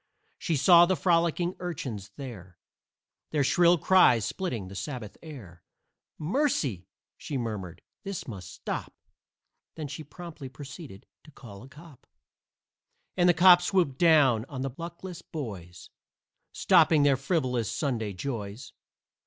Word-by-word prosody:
She 165 Hz, -, -1 dB
saw 170 Hz, +5 st, +7 dB
the 185 Hz, -, +2 dB
frolicking 170 Hz, 0 st, +1 dB
urchins 130 Hz, -, -5 dB
there, 105 Hz, -, -9 dB, 0.7 s
Their 150 Hz, -2 st, +1 dB
shrill 175 Hz, +5 st, +4 dB
cries 145 Hz, -, +4 dB
splitting 125 Hz, -, -4 dB
the 95 Hz, -, -10 dB
Sabbath 115 Hz, -1 st, -6 dB
air. 110 Hz, -, -11 dB, 0.6 s
"Mercy!" 155 Hz, -, -1 dB, 0.3 s
she 140 Hz, -, -5 dB
murmured, 100 Hz, -8 st, -5 dB, 0.2 s
"this 195 Hz, -3 st, -6 dB
must 95 Hz, -6 st, -8 dB
stop!" -, -, -6 dB, 0.8 s
Then 155 Hz, -2 st, -5 dB, 0.2 s
promptly 165 Hz, -6 st, -9 dB
proceeded 140 Hz, -, -11 dB, 0.2 s
to -, -, -16 dB
call 115 Hz, -9 st, -13 dB
a 130 Hz, -, -13 dB
cop; 150 Hz, -1 st, -16 dB, 1.1 s
And 180 Hz, -1 st, +3 dB
the 175 Hz, -, +4 dB
cop 175 Hz, +1 st, +7 dB
swooped 175 Hz, -8 st, 0 dB
down 145 Hz, -9 st, +4 dB
on 130 Hz, -2 st, -5 dB
the 135 Hz, -, -3 dB
luckless 170 Hz, +2 st, -8 dB
boys, 95 Hz, -, -8 dB, 0.6 s
Stopping 155 Hz, -3 st, +4 dB
their 140 Hz, -1 st, +4 dB
frivolous 130 Hz, -, -1 dB
Sunday 115 Hz, -4 st, -2 dB
joys. 105 Hz, +1 st, -6 dB
140 Hz, 125 wpm, -27 LUFS, 110-170 Hz, 1.1 s, saw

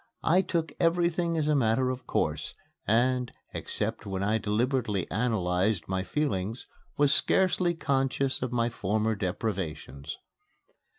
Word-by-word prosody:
I 180 Hz, +4 st, +4 dB
took 165 Hz, -4 st, -2 dB
everything 170 Hz, 0 st, +2 dB
as 150 Hz, -2 st, +1 dB
a 150 Hz, -, +3 dB
matter 130 Hz, -1 st, +2 dB
of 125 Hz, -1 st, -7 dB
course, -, -, -1 dB, 0.3 s
and, 125 Hz, +3 st, +2 dB, 0.2 s
except -, -, -3 dB
when 95 Hz, -1 st, -3 dB
I 110 Hz, +2 st, +2 dB
deliberately 110 Hz, -1 st, 0 dB
analyzed 95 Hz, -4 st, +1 dB
my 95 Hz, 0 st, -1 dB
feelings, 110 Hz, -2 st, -2 dB, 0.3 s
was 145 Hz, 0 st, +4 dB
scarcely 185 Hz, -1 st, +2 dB
conscious 135 Hz, -2 st, 0 dB
of 125 Hz, -1 st, -2 dB
my 120 Hz, -1 st, +1 dB
former 110 Hz, -1 st, 0 dB
deprivations. 90 Hz, -, -3 dB
120 Hz, 125 wpm, -28 LUFS, 100-145 Hz, 0.3 s, I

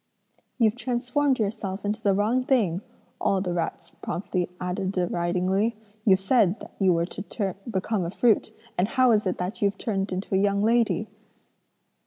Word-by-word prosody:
"'You've 225 Hz, -4 st, +4 dB
transformed 250 Hz, +3 st, 0 dB
yourself 205 Hz, -2 st, -3 dB
into 210 Hz, +1 st, -1 dB
the 200 Hz, -2 st, +3 dB
wrong 225 Hz, +6 st, +2 dB
thing,' 210 Hz, -10 st, +2 dB, 0.4 s
all 195 Hz, -, +2 dB
the 180 Hz, -2 st, -2 dB
rats 170 Hz, -1 st, -3 dB
promptly 180 Hz, -1 st, -2 dB
added 185 Hz, +1 st, -2 dB
deridingly; 185 Hz, +4 st, 0 dB, 0.3 s
'you 195 Hz, -, +7 dB
said 195 Hz, 0 st, +2 dB
that -, -, -11 dB
you 190 Hz, -2 st, +4 dB
were 170 Hz, -1 st, +2 dB
to 195 Hz, +1 st, -4 dB
become 195 Hz, -1 st, -1 dB
a 170 Hz, -, -2 dB
fruit, 220 Hz, +3 st, +2 dB, 0.3 s
and 185 Hz, -, +3 dB
how 255 Hz, 0 st, +4 dB
is 215 Hz, -3 st, +3 dB
it 180 Hz, -, -1 dB
that 180 Hz, +4 st, -4 dB
you've 200 Hz, -1 st, +1 dB
turned 195 Hz, -3 st, -2 dB
into 185 Hz, +2 st, -4 dB
a 190 Hz, -, +4 dB
young 200 Hz, 0 st, +2 dB
lady?' 230 Hz, +1 st, +2 dB
200 Hz, 165 wpm, -26 LUFS, 185-225 Hz, 0.4 s, you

